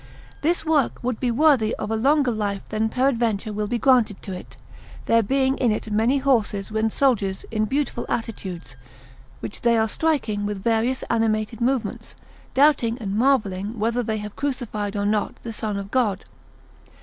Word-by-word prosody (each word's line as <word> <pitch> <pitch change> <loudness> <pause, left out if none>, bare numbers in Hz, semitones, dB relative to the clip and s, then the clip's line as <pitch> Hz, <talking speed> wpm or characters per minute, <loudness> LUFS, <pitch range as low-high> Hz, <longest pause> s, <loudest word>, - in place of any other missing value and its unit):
This 330 +2 +1
work 310 -4 +2
would 250 -2 -2
be 250 - 0
worthy 245 -3 +3
of 210 - -4
a - - +1
longer 275 +3 +3
life 205 -3 -3
than 220 +1 0
peradventure 230 -5 0
will 210 0 -2
be 240 - -1
granted 235 -5 +3
to 195 - -5
it, 180 - -9 0.5
there 230 0 +4
being 265 +4 +1
in 245 -4 +3
it 215 0 -3
many 225 +6 +2
horses 220 -7 +1
and 220 +1 0
soldiers 205 -9 +1
in 215 -1 +1
beautiful 275 +4 -2
attitudes, 185 - -4 0.7
which - - -6
they 235 -1 +3
are 220 0 +2
striking 235 -7 0
with 205 -2 -3
various 235 +3 +1
animated 225 0 0
movements, 240 -3 -1 0.4
doubting 260 -5 +4
and 200 -3 -3
marvelling 215 -4 +1
whether 230 +3 0
they 220 -2 -2
have 210 -1 -7
crucified 235 -7 -3
or 205 0 -1
not 210 0 0
the 230 - -5
Son 210 -1 -3
of 200 0 -6
God. 215 -7 +1
225 Hz, 170 wpm, -23 LUFS, 210-255 Hz, 0.7 s, there